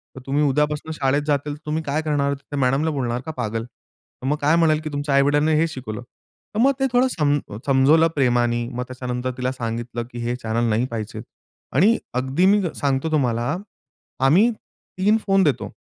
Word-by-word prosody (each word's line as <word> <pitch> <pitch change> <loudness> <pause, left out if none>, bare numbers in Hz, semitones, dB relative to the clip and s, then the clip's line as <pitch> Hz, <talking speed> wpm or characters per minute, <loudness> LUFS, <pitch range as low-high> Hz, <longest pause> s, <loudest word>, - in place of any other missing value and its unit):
तर - - -8
तुम्ही 145 +2 +1
उद्यापासून 150 +2 0
शाळेत 140 0 +1
जातील 145 0 0
तर 150 - -20
तुम्ही 155 +1 -2
काय 145 +2 -1
करणार? 145 -2 0 0.2
मॅडमला 135 +4 +2
बोलणार 125 -4 -2
का 160 - -4
पागल? 115 -1 -2
तर 125 +1 -18
मग 150 +2 +1
काय 150 +3 +4
म्हणेल, 160 -2 +3
की 155 - -4
'तुमच्या 145 -1 -1
आई-वडीलांनी 145 +3 +3
हे 165 - +3
शिकवलं.'" 120 -7 -6 0.5
तर - - 0
मग 270 +3 +5
ते 270 - +2
थोडं 250 +2 +4
सम 145 -3 +2 0.3
समजवलं 145 +4 +5
प्रेमानी 120 -3 +1
मग 125 +1 -2
त्याच्यानंतर 125 0 -4
तिला 130 0 -1
सांगितलं, 120 -1 -4
की 120 - -7
हे 120 +1 -2
चॅनेल 115 -1 -1
नाही 110 +3 +1
पाहिजे 110 -2 -5 0.5
आणि 205 - +5 0.2
अगदी 130 +8 +1
मी 205 +1 +5
सांगतो 140 +2 -1
तुम्हाला, 125 0 +1 0.7
आम्ही 185 - +5 0.5
3 210 +3 +4
फोन 195 -1 +4
देतो. 145 -4 0
140 Hz, 180 wpm, -22 LUFS, 125-155 Hz, 0.7 s, मग